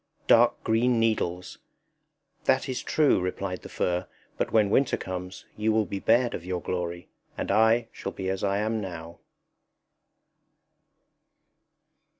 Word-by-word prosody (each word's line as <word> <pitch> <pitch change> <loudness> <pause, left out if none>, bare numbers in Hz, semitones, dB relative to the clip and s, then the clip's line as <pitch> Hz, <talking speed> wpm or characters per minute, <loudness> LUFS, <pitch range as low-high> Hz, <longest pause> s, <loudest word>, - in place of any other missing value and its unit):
Dark - - +4
green 115 +2 +2
needles! 90 -6 -1 0.9
That - - +2
is 130 - -3
true_, 150 -9 +3
replied 90 0 -3
the - - -10
fir, 90 0 -1 0.3
but - - -2
when 105 -3 +3
winter 135 +3 +3
comes, 90 0 -6
you 110 +1 +1
will 110 0 +2
be 100 - -4
bared 120 +4 +3
of 85 - -5
your 90 0 -3
glory; 85 0 -4 0.3
and - - -2
I 115 +1 +4
shall - - -6
be 95 - -5
as 95 0 -2
I 100 0 +1
am 110 +1 -1
now. 85 -3 -8
100 Hz, 140 wpm, -27 LUFS, 90-110 Hz, 0.9 s, Dark